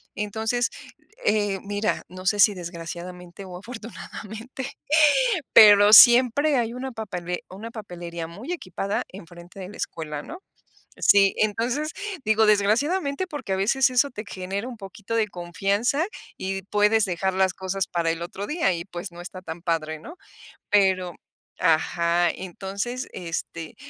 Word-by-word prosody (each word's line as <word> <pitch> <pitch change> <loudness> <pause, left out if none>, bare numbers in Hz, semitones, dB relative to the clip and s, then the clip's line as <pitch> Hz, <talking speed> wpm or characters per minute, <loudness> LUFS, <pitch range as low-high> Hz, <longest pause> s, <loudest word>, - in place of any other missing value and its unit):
Entonces, 220 +4 -1 0.6
eh, 205 -2 +1
mira, 205 +1 -1
no 185 +1 -11
sé 205 +2 +2
si, 205 +1 +6
desgraciadamente, 175 +1 -8
o 180 -1 -8
afortunadamente, 230 +3 -8 0.8
pero 205 -1 +8
siempre 255 +6 +8
hay 230 -1 0
una 250 - -7
una 260 - -8
papele 180 -5 -5
una 210 +5 -8
papelería 175 -6 -7
muy 220 - -7
equipada 200 - -3
enfrente 175 0 -12
de 185 - -7
la 205 - -11
escuela, 150 -3 -5
¿no? 340 - -9 0.6
Sí, 200 -1 +5
entonces, 240 +8 0 0.3
digo, 220 +1 +4
desgraciadamente, 280 - +2
porque 290 - -4
a - - +1
veces 240 +8 +2
eso 255 +3 +2
te 210 -2 -7
genera 195 +5 -4
un 245 - -8
poquito 210 +2 -7
de 220 -2 +2
confianza 200 - -1 0.3
y 195 0 -3
puedes 210 +2 +3
dejar 190 +1 -1
las 190 0 +2
cosas 190 0 -3
para 170 -1 0
el 165 +1 -5
otro 190 +4 -5
día 300 - +1
y, 170 +1 -5
pues, 175 0 -7
no 170 - -12
está 185 +1 -9
tan 170 -2 -8
padre, 160 -2 -1
¿no? 330 - -11 0.6
Pero 190 -3 +2 0.5
ajá 170 +1 +2
entonces, 200 +7 -5
este, 165 0 -6
200 Hz, 145 wpm, -24 LUFS, 180-225 Hz, 0.8 s, pero